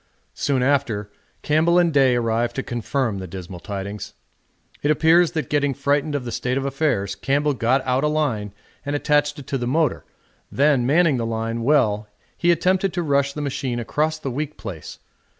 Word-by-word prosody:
Soon 135 -3 0
after 125 -7 0 0.3
Campbell 160 +3 +3
and 175 -2 +3
Day 135 -3 +4
arrived 115 0 0
to 135 - -2
confirm 120 -2 -2
the 95 - -6
dismal 90 0 -8
tidings. 100 +1 -6 0.7
It 145 - 0
appears 165 +3 +4
that 155 -5 -2
getting 145 -2 0
frightened 145 +1 0
of 135 -3 -3
the 120 - -4
state 125 +2 -1
of 135 - -2
affairs 135 -8 0
Campbell 140 +8 0
got 130 +2 +1
out 130 +1 +1
a - - +3
line 135 -10 -1 0.3
and 145 0 -2
attached 145 0 +1
it 145 - -9
to 135 - -2
the 120 - -2
motor 155 +4 +1 0.5
then 140 -3 +3
manning 155 -1 +3
the 115 - -2
line 115 +1 -2
well 115 -6 +2 0.3
he 175 - 0
attempted 185 +2 +1
to 175 -1 -1
rush 140 -2 +1
the 150 - -5
machine 130 -3 -2
across 155 +7 -1
the 140 -4 -5
weak 150 +4 -4
place. 80 -5 -8
135 Hz, 185 wpm, -22 LUFS, 115-150 Hz, 0.7 s, Day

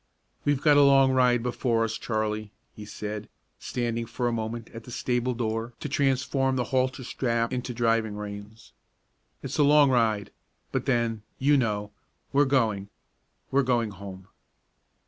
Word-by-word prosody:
"We've 145 -2 +2
got 150 -2 +6
a - - +7
long 135 -1 +6
ride 125 -2 +3
before 120 -2 0
us, 110 -1 -2
Charlie," 110 -1 -2 0.3
he 105 - -9
said, 105 0 -6 0.3
standing 115 -1 -3
for 120 +1 -2
a - - +1
moment 115 0 -4
at 115 -1 -10
the - - -11
stable 125 +1 -1
door 115 0 -2
to - - -4
transform 135 -1 +1
the 125 - +1
halter 130 0 +1
strap 115 -1 -1
into 125 0 -3
driving 115 -2 +1
reins. 105 +1 -9 0.7
"It's - - -4
a - - +6
long 145 -1 +6
ride; 110 -5 +1 0.4
but - - -2
then, 115 -4 +1 0.2
you 145 +2 +3
know, 105 -5 0 0.4
we're 145 +1 +5
going 110 -7 +1 0.6
we're 140 - +4
going 120 -4 +1
home!" 95 -1 -10
120 Hz, 155 wpm, -27 LUFS, 110-130 Hz, 0.7 s, a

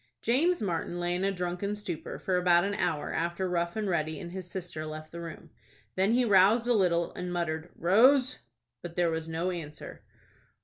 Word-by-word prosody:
James 300 +5 +2
Martin 175 -1 -2
lay 175 0 0
in 180 +1 -1
a 195 - +2
drunken 180 +2 -3
stupor 185 -6 -6
for 185 - -1
about 175 -1 +4
an 200 +1 -1
hour 160 -7 -1
after 170 +3 -1
Rough 170 -1 -1
and 215 -2 -2
Ready 155 -4 -1
and 170 - -7
his 185 -1 -7
sister 175 -4 -6
left 155 0 -7
the 170 - -7
room. 165 -2 -9 0.4
Then 195 +4 +2
he 250 +1 +3
roused 205 +3 +5
a 245 - +3
little, 175 -5 +2
and 180 0 -5
muttered 170 -1 -2
"Rose." 255 - +4 0.4
But 170 -1 -8
there 175 -2 +2
was 160 0 -3
no 165 +3 -1
answer. 155 -4 -8
175 Hz, 190 wpm, -29 LUFS, 170-195 Hz, 0.4 s, roused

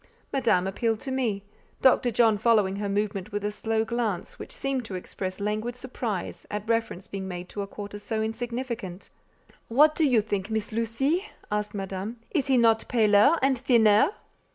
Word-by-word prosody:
Madame 230 -9 +2
appealed 220 +3 0
to 265 - -5
me—Dr. 245 +1 0
John 225 -2 +3
following 210 -4 +3
her 205 0 -2
movement 200 -1 -2
with 205 0 -3
a 210 - 0
slow 220 +1 -1
glance 225 -6 -2
which - - -8
seemed 270 -2 -2
to 200 - -6
express 185 +1 -5
languid 215 +4 -2
surprise 240 -6 -5
at 210 +1 -4
reference 225 -5 -1
being 195 -1 -6
made 180 -1 -6
to 205 - -5
a 200 - -4
quarter 205 0 -7
so 220 +2 -3
insignificant. 235 -4 -4 0.6
"What 300 +6 +5
do 320 - 0
you 245 -5 +4
think, 205 -1 -3
Miss 220 -1 -2
Lucie?" 270 - 0 0.2
asked 210 0 -2
Madame. 195 +3 -4
"Is 285 -6 0
he 265 -2 +4
not 225 -2 +3
paler 220 +6 +5
and 270 0 +4
thinner?" 230 -2 +5
220 Hz, 170 wpm, -27 LUFS, 205-240 Hz, 0.6 s, What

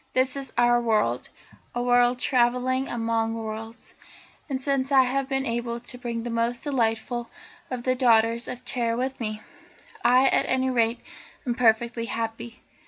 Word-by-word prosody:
This 255 +1 +2
is 275 -1 -6
our 240 0 +4
world, 210 - 0 0.5
a 240 - -1
world 245 0 +4
travelling 250 +1 +1
among 225 -1 -1
worlds, 225 +1 -7 0.6
and 265 -2 -2
since 270 0 -1
I 265 -1 +7
have 265 +1 -1
been 270 -1 0
able 235 -1 -2
to 245 +1 -8
bring 235 -2 -4
the 240 - -4
most 235 +1 -1
delightful 240 -3 -1 0.4
of 250 -2 -4
the 255 - +2
daughters 235 -2 +3
of 250 0 -7
Terra 235 -2 0
with 260 +2 -2
me, 215 -2 -4 0.6
I, 255 +2 +5
at - - +2
any 260 0 +1
rate, 230 -1 +1 0.4
am 245 - 0
perfectly 235 0 +2
happy. 230 0 -5
240 Hz, 160 wpm, -25 LUFS, 230-255 Hz, 0.6 s, I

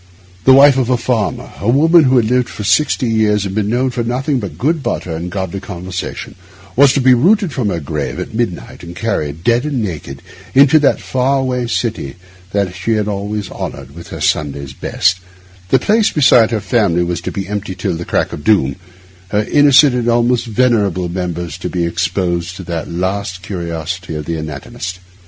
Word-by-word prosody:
The 130 - +7
wife 135 0 +7
of 125 -2 0
a 125 - +3
farmer, 115 -4 -2
a 100 - -1
woman 160 +5 +5
who 130 0 +3
had 120 - +3
lived 125 +1 +1
for 105 - -7
sixty 125 +5 +2
years, 105 -2 +1
and 95 - -4
been 105 0 -1
known 125 +3 +1
for 125 -1 -2
nothing 130 +4 -1
but 100 -5 -7
good 155 +4 0
butter 85 -10 -3
and 85 +2 -4
a - - -5
godly 95 0 -4
conversation, 90 -2 -6 0.4
was 140 +1 +6
to - - +1
be 130 0 +6
rooted 180 - +3
from 120 -6 -1
her 85 -3 -2
grave 70 - -4
at - - -6
midnight 110 -6 -3
and 85 0 -9
carried, 80 -8 -3
dead 120 +1 +2
and 140 -6 -2
naked, 75 -8 -6 0.3
to 140 +3 +6
that 145 - +2
far 130 +2 0
away 125 -2 -1
city 115 - -2 0.4
that 100 -2 -1
she 90 +6 -1
had 105 -1 0
always 100 -1 -3
honoured 70 -1 -7
with 85 +2 -11
her - - -8
Sunday's 70 -2 -1
best; 95 +7 0 0.5
the - - +5
place 215 0 +2
beside 125 -6 +5
her 110 -3 -1
family 95 -4 +1
was 85 0 -3
to - - -4
be 95 -1 -4
empty 100 -2 -4
till 90 - -2
the 85 +1 -5
crack - - -1
of 75 - -7
doom; 70 -8 +2 0.5
her 105 +2 0
innocent 145 -1 +6
and 120 -1 0
almost 120 +1 +2
venerable 105 -7 +1
members 85 -2 -4
to - - -4
be 85 -2 -1
exposed 85 0 -1
to 95 - -8
that 85 -2 -4
last 95 +1 -3
curiosity 85 -2 -5
of 75 -1 -5
the 85 - -3
anatomist. 80 +3 -6
105 Hz, 195 wpm, -16 LUFS, 90-125 Hz, 0.5 s, The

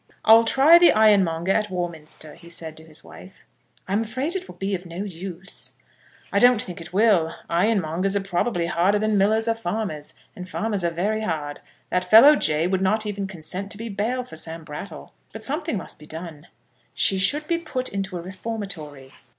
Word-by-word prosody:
"I'll 225 +1 +7
try 285 +8 +6
the 345 - +7
ironmonger 190 -5 +3
at 210 +1 +1
Warminster," 160 -4 -5
he 170 - -15
said, 160 -2 -6
to 160 - -9
his 160 -1 -7
wife. 190 +1 -14 0.4
"I'm 200 +3 +1
afraid 260 - -3
it 375 0 -4
will - - -11
be 195 +1 -3
of 180 -1 -4
no 170 +3 -5
use." 185 0 -8 0.6
"I 200 - +4
don't 245 0 +6
think 180 -7 -4
it 165 - -10
will. 190 -5 +3
Ironmongers 185 0 +1
are 200 - +1
probably 180 -1 -1
harder 175 +4 +2
than 215 0 0
millers 215 +3 +2
or 230 - +3
farmers, 190 -8 -4 0.2
and 180 0 -8
farmers 205 -1 -2
are 170 - +2
very 200 +6 -1
hard. 150 -8 -3 0.3
That 180 - +1
fellow, 255 +9 +9
Jay, 155 - +1
would 185 +1 0
not 215 +3 +2
even 200 -1 -3
consent 190 +2 -5
to - - -11
be 230 +1 -6
bail 225 +5 -2
for 200 -10 -12
Sam 160 +1 -4
Brattle. 150 - -9 0.2
But - - -8
something - - -2
must - - -7
be 150 - -14
done." 160 -1 -8 0.5
"She 195 - +2
should 295 +11 +2
be 335 0 0
put 260 -6 -3
into 195 -2 -4
a 170 - -7
reformatory." 185 -9 -7
195 Hz, 190 wpm, -23 LUFS, 170-220 Hz, 0.6 s, fellow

